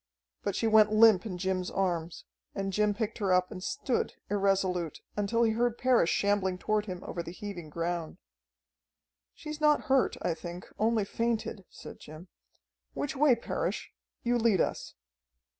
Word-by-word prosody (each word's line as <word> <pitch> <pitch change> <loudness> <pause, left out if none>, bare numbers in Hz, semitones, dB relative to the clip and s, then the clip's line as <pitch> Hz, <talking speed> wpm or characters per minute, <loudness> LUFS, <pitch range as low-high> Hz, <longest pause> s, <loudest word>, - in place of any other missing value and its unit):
But 200 -2 -2
she 230 - -1
went 215 -1 +5
limp 215 -2 +6
in 185 -4 -5
Jim's 185 0 -1
arms, 175 -3 -2 0.3
and 195 -1 -2
Jim 210 +1 +2
picked 220 0 -3
her 195 -3 0
up 180 0 +3
and 185 - -7
stood 250 - -1 0.2
irresolute, 190 -5 0 0.2
until 210 +3 +1
he 225 - +3
heard 235 +1 0
Parrish 250 -9 +3
shambling 200 -2 +1
toward 215 +2 -1
him 185 -1 -6
over 170 - -4
the 170 - -8
heaving 180 -4 -7
ground. 170 0 -3 1.2
"She's 305 0 -7
not 300 -1 +4
hurt, 265 -1 +2
I 170 - +1
think, 175 +2 -8
only 220 -1 +2
fainted," 225 -2 -2
said - - -11
Jim. 155 +4 -12 0.7
"Which 285 - -3
way, 275 -2 +5
Parrish? 235 - -3 0.3
You 240 0 +2
lead 220 -5 +3
us." - - -2
200 Hz, 160 wpm, -30 LUFS, 180-230 Hz, 1.2 s, limp